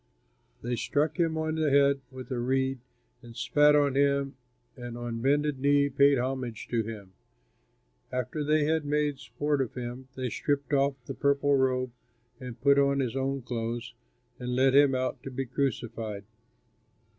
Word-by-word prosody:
They 120 0 -2
struck 150 +8 0
him 165 -2 +1
on 160 0 -1
the 155 -1 +1
head 140 0 +4
with 130 +1 -10
a 125 - -1
reed 130 +1 0 0.4
and 120 -2 -13
spat 145 +5 +4
on 145 -2 +3
him, 140 -1 +1 0.4
and 120 -2 -7
on 120 -1 -4
bended 145 +1 +1
knee 140 +1 +3
paid 140 +1 +4
homage 125 -2 -3
to 115 -2 +1
him. 105 -4 -8 1.0
After 125 +4 -2
they 150 +1 +2
had 160 0 +1
made 145 -1 0
sport 135 +5 -1
of 130 - -4
him, 125 +1 -6
they 130 -2 -3
stripped 145 -1 -1
off 140 0 +2
the - - -5
purple 140 0 +2
robe 130 -1 +1 0.5
and 125 -2 -8
put 140 +1 +5
on 140 0 +3
his 130 -2 -1
own 135 0 -2
clothes, 120 0 -4 0.5
and 125 0 -3
led 130 +1 +4
him 140 -1 +5
out 130 0 -2
to - - -7
be 135 +1 -3
crucified. 115 -5 -3
135 Hz, 165 wpm, -28 LUFS, 125-140 Hz, 1.0 s, put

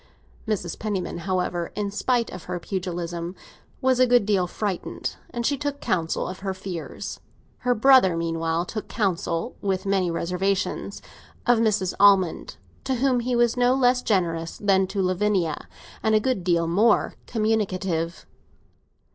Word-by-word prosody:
Mrs. 185 -6 -2
Penniman, 200 -5 -3
however, 180 -2 -1
in 205 -1 -2
spite 235 +3 0
of 180 -2 -9
her 180 0 -3
pugilism, 175 -1 -4 0.5
was 260 -1 +3
a 255 - +6
good 245 -4 +4
deal 195 -4 +2
frightened, 195 0 -3
and 240 -1 -4
she 280 +1 +1
took 285 -1 -3
counsel 165 -3 -1
of 185 - -6
her 190 -1 -3
fears. 185 -3 -6 0.4
Her 250 -1 +1
brother 230 -8 +5
meanwhile 165 0 -1
took 215 +3 -5
counsel, 190 -1 -1
with 190 -1 -1
many 195 -2 +1
reservations, 180 +4 -2 0.4
of 245 -2 +4
Mrs. 215 -5 +1
Almond, 195 -4 +4 0.3
to 265 - 0
whom 255 0 +2
he 245 +1 -1
was 240 -1 +3
no 245 +1 +3
less 250 -1 +3
generous 165 -6 0
than 195 -2 +2
to 195 0 -1
Lavinia, 185 -3 0 0.3
and 220 0 +2
a - - +5
good 215 -4 -1
deal 170 -2 +2
more 205 +7 +3
communicative. 190 -7 -1
195 Hz, 145 wpm, -24 LUFS, 175-230 Hz, 0.5 s, a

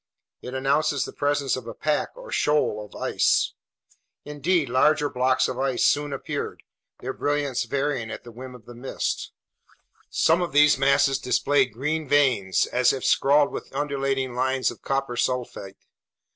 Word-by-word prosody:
It 125 +1 -7
announces 140 +1 +1
the - - -9
presence 145 -2 0
of 130 -3 -8
a 115 - -7
pack, 150 -1 -1
or - - -11
shoal, 150 - +1
of 105 - -14
ice. - - +1 0.7
Indeed, 150 +2 0
larger 145 +4 +2
blocks 130 +1 +2
of 130 - -5
ice 135 -2 +1
soon 145 0 +2
appeared, 135 - -5 0.4
their 130 +1 -4
brilliance 145 -3 -1
varying 135 -5 -2
at - - -7
the 120 - -11
whim 125 +2 -10
of 120 - -15
the 120 - -11
mists. 125 +3 -4 0.8
Some 165 +3 +2
of 175 - -3
these 150 +1 +6
masses 135 0 +3
displayed 135 -1 +1
green 150 +6 -2
veins, 125 -11 +2
as 125 0 +2
if 135 - -4
scrawled 145 +1 +3
with - - -8
undulating 135 -3 -1
lines 130 +1 0
of 120 - -13
copper 135 -2 -2
sulfate. 120 -6 -3
135 Hz, 160 wpm, -24 LUFS, 125-145 Hz, 0.8 s, these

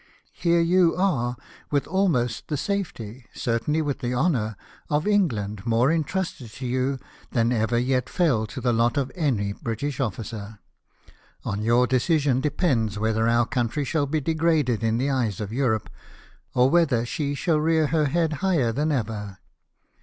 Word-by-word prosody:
Here 170 -1 +2
you 175 0 +4
are, 125 -11 0 0.3
with 145 -2 +1
almost 150 - 0
the 150 - -2
safety 130 - -4
— - - -33
certainly 135 +7 0
with 145 -2 -2
the 125 -2 -2
honour 120 - 0 0.2
— - - -22
of 150 +1 +1
England 110 - 0
more 120 +4 +3
entrusted 165 -5 -2
to 130 - -7
you 130 +2 0 0.4
than 115 0 +2
ever 120 0 +1
yet 125 +1 0
fell 130 -12 +1
to 130 +4 -7
the 125 -1 +1
lot 115 +2 +2
of 135 -1 0
any 120 - 0
British 125 +6 -4
officer. 110 -2 -4 0.9
On 100 +1 -2
your 120 +3 +3
decision 130 +1 +2
depends 130 - 0
whether 110 +1 +1
our 120 0 +3
country 125 +4 -1
shall 145 0 0
be 155 +3 0
degraded 155 -6 +1
in 115 0 +1
the 135 +3 0
eyes 115 -8 -1
of 105 0 -4
Europe, 120 -5 0 0.7
or 125 +1 +5
whether 145 -9 +3
she 145 +2 -2
shall 155 +2 +1
rear 160 0 +2
her 155 +1 +1
head 160 +2 +1
higher 165 -12 +2
than 150 +6 0
ever. 105 -7 -3
130 Hz, 165 wpm, -25 LUFS, 115-155 Hz, 0.9 s, or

